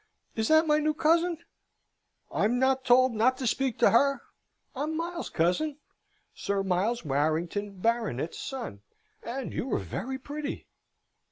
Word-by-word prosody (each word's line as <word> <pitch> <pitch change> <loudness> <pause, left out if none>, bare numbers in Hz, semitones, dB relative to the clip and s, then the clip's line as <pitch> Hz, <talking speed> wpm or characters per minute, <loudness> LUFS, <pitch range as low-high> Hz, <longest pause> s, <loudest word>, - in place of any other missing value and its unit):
Is 220 -1 0
that 315 +1 +5
my 300 -1 +3
new 305 0 0
cousin? 335 +2 +2 0.9
I'm 230 +4 +1
not 265 +1 +2
told 255 0 +5
not 245 +4 +2
to 260 - -4
speak 260 0 0
to - - +5
her. 275 +2 +3 0.5
I'm 305 +4 -2
Miles, 340 +1 -4
cousin, 275 - 0 0.6
Sir 200 -1 -2
Miles 195 +4 0
Warrington 165 +8 -1
Baronet's 220 - -1
son, 240 - -6 0.4
and 250 +2 -5
you 265 - -3
are - - +2
very 265 +1 -4
pretty!" 290 +2 -6
255 Hz, 140 wpm, -28 LUFS, 205-295 Hz, 0.9 s, that